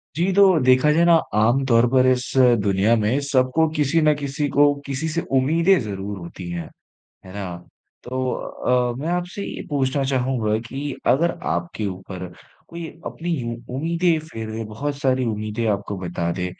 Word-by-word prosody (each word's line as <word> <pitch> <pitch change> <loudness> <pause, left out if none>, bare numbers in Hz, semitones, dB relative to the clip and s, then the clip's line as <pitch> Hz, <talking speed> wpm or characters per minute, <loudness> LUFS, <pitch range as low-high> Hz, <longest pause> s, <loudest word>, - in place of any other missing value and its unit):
जी, 175 +4 +1
तो 190 -3 +5
देखा 130 +3 +5
जाए 165 +3 +3
ना, 170 - +6 0.2
आम 115 +6 +3
तौर 115 -2 +4
पर 130 0 +4
इस 125 -1 +2 0.4
दुनिया 100 +3 +3
में 115 +5 +1
सबको, 135 +4 +2
किसी 150 +2 +2
न 155 -1 +4
किसी 145 +1 -2
को, 145 0 +5
किसी 140 +3 -3
से 170 +2 -1 0.2
उम्मीदें 165 +8 +3
ज़रूर 100 -2 -5
होती 85 +1 -8
हैं। 85 -2 -5 0.6
है 95 - -11
ना? 95 -3 -5 0.5
तो 130 +1 -2
अ, 125 -1 -1
मैं 150 +4 -3
आपसे 180 +3 -3
ये - - -6
पूछना 135 -1 0
चाहूँगा 125 -5 0
कि 140 +1 -4 0.2
अगर 170 +6 +2 0.2
आपके 85 +5 -3
ऊपर 95 -1 -6 0.4
कोई 170 0 -7 0.2
अपनी 170 +2 -4
यूँ 120 -2 -4 0.2
उम्मीदें, 165 +3 +1
फिर 110 -3 -5
बहुत 140 +7 -4
सारी 130 -2 +1
उम्मीदें 110 +1 -2
आपको 100 0 -4
बता 85 -2 -3
दे, 90 +1 -3
130 Hz, 165 wpm, -22 LUFS, 105-150 Hz, 0.6 s, ना